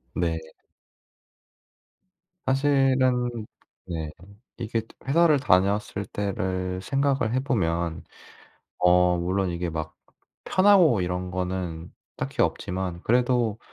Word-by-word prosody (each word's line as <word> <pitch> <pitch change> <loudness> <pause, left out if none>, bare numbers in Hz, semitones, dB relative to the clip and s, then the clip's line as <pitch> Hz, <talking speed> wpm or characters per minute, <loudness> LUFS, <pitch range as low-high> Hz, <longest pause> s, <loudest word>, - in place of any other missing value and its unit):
네. 85 -2 0 2.1
사실은 130 -4 +2 0.4
네. 80 -3 -4 0.5
이게 115 -1 -2 0.3
회사를 155 +1 +4
다녔을 100 -2 +1
때를 95 -2 -2
생각을 135 0 0
해 130 - +2
보면 85 - -1 0.8
어 90 0 +4
물론 95 +2 0
이게 85 0 -3
막 80 -1 -5 0.5
편하고 185 - +5
이런 90 0 -2
거는 90 -2 -4 0.2
딱히 - - -1
없지만 90 -1 -2
그래도 120 -2 +2
95 Hz, 185 characters per minute, -25 LUFS, 90-130 Hz, 2.1 s, 편하고